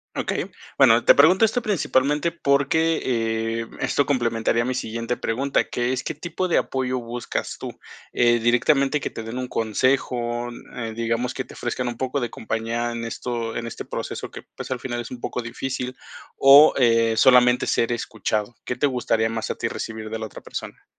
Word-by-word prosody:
Okey. - - -2 0.3
Bueno, - - +5
te - - +8
pregunto 190 +4 +6
esto 230 +3 0
principalmente 150 - +1
porque, 160 +2 +2 0.6
eh, - - -5
esto 145 - +1
complementaría 115 -3 +1
mi 130 - -1
siguiente 115 0 -3
pregunta, 135 +5 0
que 120 +1 -1
es 130 - -3
¿qué - - -3
tipo 175 +2 -3
de - - +3
apoyo 130 -1 -1
buscas 120 0 -4
tú? - - -8 0.3
Eh, 120 -1 +3
¿directamente 135 +5 +3
que - - -3
te 115 - -7
den 115 +3 -6
un 130 - -3
consejo?, 120 +1 0 0.3
eh, 115 -2 -4
n 110 - -7
digamos, 115 +2 -1
¿que 130 - -4
te - - -13
ofrezcan 125 +1 -3
un 120 - -3
poco 130 +2 -1
de 120 -3 -2
compañía 115 +2 -3
en 115 0 -4
esto 115 0 -4
en 115 0 -3
este 115 - -7
proceso - - -5
que, - - -9 0.2
pues, - - -6
al 125 - -2
final 120 -2 -3
es 120 - -6
un 125 - -8
poco 125 - -3
difícil? 125 +2 -4 0.4
o 140 +3 +8
eh, 115 -2 +4
¿solamente 125 0 +5
ser 120 +1 +1
escuchado? 110 -1 -2
¿Qué 125 - -2
te 145 +3 +2
gustaría 115 -3 0
más 115 -1 -3
a - - -2
ti - - -2
recibir 110 -1 -6
de 110 - -4
la 110 - -4
otra 110 - -10
persona? - - -8
120 Hz, 190 wpm, -23 LUFS, 115-135 Hz, 0.6 s, te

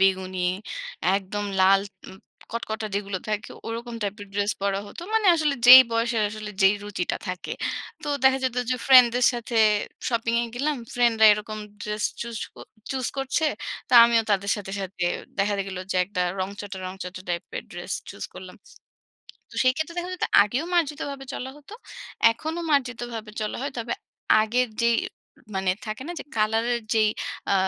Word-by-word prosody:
বেগুনি, 190 -1 +1 0.8
একদম 200 +1 -4 0.2
লাল 195 +1 +6 0.3
উম 190 - -11 0.4
কটকটা 220 -2 -3
যেগুলো 200 -1 -2
থাকে 210 0 -3 0.2
ওরকম 235 +1 -5
টাইপের 205 0 -4
ড্রেস 205 +1 +1
পরা 200 0 0
হতো। 205 - -10
মানে 440 -2 +3
আসলে 305 -3 +1
যেই 260 +1 +13
বয়সের 230 -1 +1
আসলে 215 0 -7
যেই 195 +2 +6
রুচিটা 205 -4 -2
থাকে। 180 0 -5 0.5
তো - - -5
দেখা 265 0 +5
যেত 255 -1 -1
যে, 255 - +2
ফ্রেন্ডদের 250 -2 +7
সাথে 240 -1 -4 0.5
শপিং 230 -1 0
এ - - -1
গেলাম। 290 +4 0 0.2
ফ্রেন্ডরা 235 -3 +5
এরকম 210 +1 -4 0.2
ড্রেস 210 0 -3 0.2
চুস 235 -1 -5 0.2
ক - - -53 0.3
চুস 260 -2 -1
করছে 270 +4 0 0.4
তো - - -9
আমিও 235 -1 +3
তাদের 200 0 +1
সাথে, 195 -2 -7
সাথে 190 -2 -4 0.3
দেখা 205 +1 +2
গেল 190 -1 -6 0.2
যে, - - -1
একটা 185 -1 -4 0.2
রংচটা, 200 +1 -5
রংচটা 185 0 -7
টাইপের 170 -1 -4
ড্রেস - - -6 0.2
চুস - - -7
করলাম। - - -10 0.9
তো - - -15
সেই 255 0 +4
ক্ষেত্রে 315 +2 -3
দেখা 350 +1 -3
যেত 365 - -2 0.2
আগেও 240 +9 -2
মার্জিতভাবে 285 -4 -1
চলা 260 - -5
হতো। 295 +6 -15 0.6
এখনো 315 +9 -5
মার্জিতভাবে 240 -5 -1
চলা 210 -1 -2
হয়। 280 - -2
তবে 235 0 -3 0.5
আগের 245 +3 +1
যেই 235 0 +4 0.6
মানে 190 -1 +1 0.2
থাকে 215 +4 -5
না - - -3
যে, - - -8
কালার 220 +1 +2
এর 235 - -2
যেই 215 -1 +4 0.4
আ - - +4
225 Hz, 165 wpm, -25 LUFS, 200-250 Hz, 0.9 s, যেই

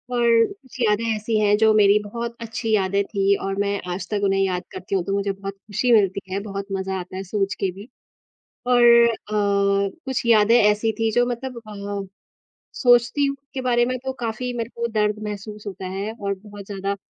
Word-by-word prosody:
और 240 -1 +2 0.3
कुछ 260 -10 -16
यादें 220 -2 +2
ऐसी 215 +1 -1
हैं 210 -1 +4
जो 220 0 +4
मेरी 205 -1 +5
बहुत 235 +3 -5
अच्छी 225 0 -4
यादें 200 0 +1
थी 200 -1 +1
और 195 0 -2
मैं 200 0 0
आज 185 - -5
तक 205 -1 0
उन्हें 195 -1 +2
याद 185 -2 0
करती 185 +1 -4
हूँ, 185 - +1
तो 195 - -3
मुझे 200 0 0
बहुत 195 0 -6
खुशी 210 +5 -2
मिलती 200 -3 +3
है, 195 - -1
बहुत 200 -1 -5
मज़ा 190 0 -2
आता 180 +1 -8
है 190 - -4
सोच 195 0 -1
के 190 - 0
भी। 200 +5 -11 0.8
और 245 -1 +4 0.3
अ, 230 - 0 0.9
कुछ 265 -2 -2
यादें 225 0 +5
ऐसी 210 +2 +2
थी 225 0 +1
जो 245 - +3
मतलब 245 0 -5
अ, 200 -1 -5 0.7
सोचती 245 +3 +4
हूँ 275 0 -2 0.2
के 265 - -2
बारे 240 -2 +2
में 255 +1 -1
तो 265 - -2
काफ़ी 240 +2 -3
मेरे 230 0 -3
को 235 0 -1
दर्द 210 -1 0
महसूस 210 0 -7
होता 190 -2 -6
है 200 +3 -3
और 200 -3 -3
बहुत 205 +1 -12
ज़्यादा 200 0 -3
210 Hz, 200 wpm, -22 LUFS, 195-235 Hz, 0.9 s, मेरी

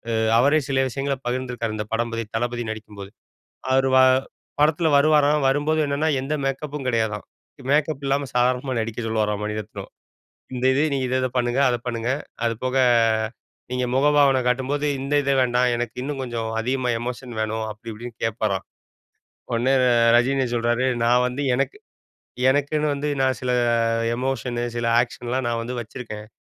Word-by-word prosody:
அ - - +1 0.2
அவரே 145 +4 +4
சில 135 -1 +1
விஷயங்கள 135 +2 -2
பகிர்ந்திருக்கார் 120 -3 -3
இந்த 105 - -3
படம் 115 +1 -1
பத்தி, 115 0 -3
தளபதி 120 0 -2
நடிக்கும்போது. 105 -2 -9 0.6
அவரு 135 0 +3
வ - - +7 0.6
படத்துல 155 +2 +3
வருவாராம், 150 -1 +3
வரும்போது 145 +3 +1
என்னன்னா 145 +3 0
எந்த 135 +3 -3
மேக்கப்பும் 140 +1 -3
கெடையாதாம். 110 -3 -1 0.5
மேக்கப் 145 -1 +1
இல்லாம 140 +1 0
சாதாரணமா 125 +2 +1
நடிக்க 110 +1 -5
சொல்லுவாராம் 105 -2 -1
மணிரத்னம். 105 0 -6 0.6
"இந்த 125 +1 -2
இது. 140 - +2
நீங்க 135 -2 0
இத 130 - 0
இத 130 - +1
பண்ணுங்க. 120 +2 +1
அத 120 - +1
பண்ணுங்க. 115 0 -2 0.4
அது 115 - +1
போக 130 +1 0 0.9
நீங்க 125 0 0
முகபாவன 140 -1 +4
காட்டும்போது, 135 +4 0 0.2
இந்த 140 +2 -3
இத 140 - +1
வேண்டாம். 125 0 +2
எனக்கு 120 0 -4
இன்னும் 140 0 -4
கொஞ்சம 120 -2 -4 0.2
அதிகமா 125 +1 -1
எமோஷன் 120 0 -6
வேணும்." 110 0 -2
அப்படி 110 +2 -9
இப்படீன்னு 120 +1 -9
கேட்பாராம். 110 -4 -1 0.9
ஒடனே 120 +3 +2
ர - - +3 0.3
ரஜினி 130 +2 +2
சொல்றாரு, 120 +2 +1 0.2
நான் 125 +1 +4
வந்து 125 +3 -4
எனக்கு 140 - -1 0.7
எனக்குன்னு 145 +2 +1
வந்து 145 +1 -3
நான் 130 -1 +1
சில 125 -1 -1 0.6
எமோஷனு, 125 -2 -2
சில 120 - -1
ஆக்ஷன்லாம் 125 +1 -3
நான் 115 -1 -1
வந்து 125 +2 -5
வச்சுருக்கேன். 110 -2 -8
125 Hz, 150 wpm, -23 LUFS, 115-135 Hz, 0.9 s, வ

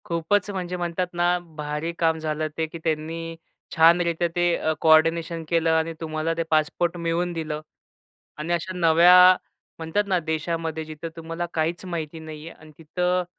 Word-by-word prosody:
खूपच 175 +5 0
म्हणजे 180 -2 -4
म्हणतात 175 +1 -2
ना, 175 +1 +2
भारी 155 -1 -5
काम 160 -1 +2
झालं 155 0 -2
ते 160 - 0
की 160 - -9
त्यांनी 165 +1 -3 0.4
छानरित्या 170 +1 +4
ते 175 -1 +2
अ, 155 - 0
कोऑर्डिनेशन 165 +1 +3
केलं 165 -1 +2
आणि 160 +1 0
तुम्हाला 155 0 -2
ते 165 - 0
पासपोर्ट 160 +3 +1
मिळवून 170 +1 -1
दिलं 155 -2 -4 0.8
आणि 160 +3 -2
अशा 175 +2 -2
नव्या 170 +1 +6 0.6
म्हणतात 165 +6 0
ना 185 -2 +2
देशामध्ये 160 0 -3
जिथं 155 +1 -7
तुम्हाला 165 +1 -5
काहीच 165 +3 -1
माहिती 165 -3 -5
नाहीये 160 0 -9
अन् 155 -1 -16
तिथं 180 +3 -1
165 Hz, 150 wpm, -24 LUFS, 160-175 Hz, 0.8 s, नव्या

